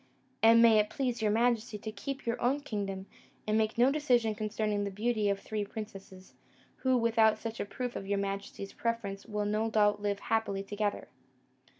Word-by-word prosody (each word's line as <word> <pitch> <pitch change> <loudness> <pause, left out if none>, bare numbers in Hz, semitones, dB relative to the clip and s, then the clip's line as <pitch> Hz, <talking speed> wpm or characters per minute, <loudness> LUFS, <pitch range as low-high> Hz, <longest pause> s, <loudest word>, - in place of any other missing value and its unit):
And 230 +1 +7
may 225 -2 +7
it 210 0 +1
please 245 -3 -2
your 215 - +2
majesty 230 0 +1
to 220 +1 -6
keep 275 +5 -6
your 235 0 -2
own 265 +4 +1
kingdom, 200 -7 -4 0.4
and 215 - +1
make 220 0 +1
no 250 +3 +5
decision 245 -7 +2
concerning 215 -1 -1
the 200 - -2
beauty 215 +1 0
of 200 0 0
three 215 +1 -3
princesses, 195 -3 -9 0.4
who, 260 -1 +2
without 225 -2 +4
such 225 0 -6
a - - -1
proof 245 +4 -5
of 195 - -5
your 200 0 0
majesty's 195 0 -4
preference, 225 -4 -3
will 210 -1 -2
no 215 +2 0
doubt 210 -1 +3
live 205 -1 0
happily 220 -3 -1
together!" 205 +1 -2
215 Hz, 185 wpm, -31 LUFS, 205-230 Hz, 0.4 s, And